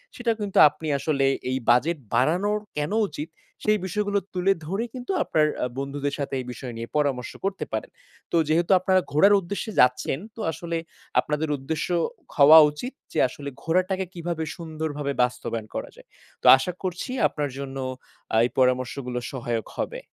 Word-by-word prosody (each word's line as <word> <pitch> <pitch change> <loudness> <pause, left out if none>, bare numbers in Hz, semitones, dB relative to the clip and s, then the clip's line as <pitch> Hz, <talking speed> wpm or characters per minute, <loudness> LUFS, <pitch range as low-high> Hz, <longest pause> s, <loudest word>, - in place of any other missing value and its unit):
সেটা 240 -1 0
কিন্তু 205 -2 -3
আপনি 155 +2 -8
আসলে 140 -1 +1 0.2
এই 130 - 0
বাজেট 150 +8 +4 0.2
বাড়ানো 170 - +2 0.3
কেন 150 0 -1 0.2
উচিত? 150 +2 -6 0.3
সেই 215 0 +3
বিষয়গুলো 205 +2 0
তুলে 185 +2 +2
ধরে 195 +8 -2
কিন্তু 250 +7 -5
আপনার 155 -1 +2 0.2
আ - - +2
বন্ধুদের 140 +1 -3
সাথে 140 - -3
এই 125 - -5
বিষয় 125 0 -7
নিয়ে 115 0 -5
পরামর্শ 135 -4 0
করতে 195 0 -2
পারেন। - - -3 0.4
তো 170 - +2
যেহেতু 170 +3 +2
আপনারা 185 0 +3
ঘোরার 195 +8 +6
উদ্দেশ্যে 200 +5 -4
যাচ্ছেন, 125 +2 +3 0.2
তো 225 - -7
আসলে 165 +1 -4 0.4
আপনাদের 150 +1 -1
উদ্দেশ্য 150 +3 -3 0.5
হওয়া 150 +2 +9
উচিত 245 - -6 0.2
যে, - - 0
আসলে 140 +1 -7
ঘোরাটাকে 185 +3 +1
কিভাবে 170 -2 -3
সুন্দরভাবে 155 -3 -4
বাস্তবায়ন 120 -3 -3
করা - - -4
যায়। - - -17 0.3
তো - - -13
আশা 135 +7 -2
করছি 185 +8 -3 0.2
আপনার 145 -2 -3
জন্য 135 -1 -6 0.6
আ - - +4
এই - - -1
পরামর্শগুলো 125 0 +1
সহায়ক 120 -4 -3
হবে। - - -3
155 Hz, 160 wpm, -25 LUFS, 135-185 Hz, 0.6 s, হওয়া